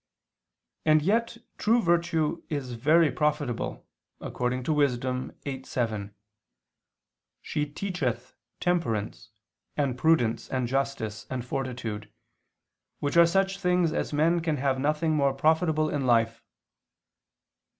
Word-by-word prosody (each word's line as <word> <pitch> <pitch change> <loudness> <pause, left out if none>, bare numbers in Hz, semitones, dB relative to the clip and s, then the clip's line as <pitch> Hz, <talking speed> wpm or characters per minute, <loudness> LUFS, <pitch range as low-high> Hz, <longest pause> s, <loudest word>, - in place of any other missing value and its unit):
And 155 -1 +4
yet 230 +5 +1 0.2
true 230 +3 +3
virtue 170 -3 +1
is 140 -5 -3
very 155 +6 +4
profitable, 150 -5 -2 0.3
according 125 +1 -2
to 155 - 0
Wis. 140 -4 +2
8:7: 125 -4 -4 1.3
"She 150 0 -2
teacheth 150 - -3 0.3
temperance, 115 - -1 0.5
and 140 -4 +1
prudence, 125 -5 +2
and 130 -2 -1
justice, 125 -5 -2
and 125 -2 -4
fortitude, 120 -5 -4 0.9
which 145 +2 -2
are 170 0 +7
such 195 +2 +1
things 180 -3 +2
as - - -2
men 160 +4 +2
can 160 -3 -1
have 135 -1 0
nothing 155 +3 +1
more 140 -2 +2
profitable 155 +1 +2
in 140 -4 -1
life." 115 -1 +2
145 Hz, 110 wpm, -27 LUFS, 125-165 Hz, 1.3 s, are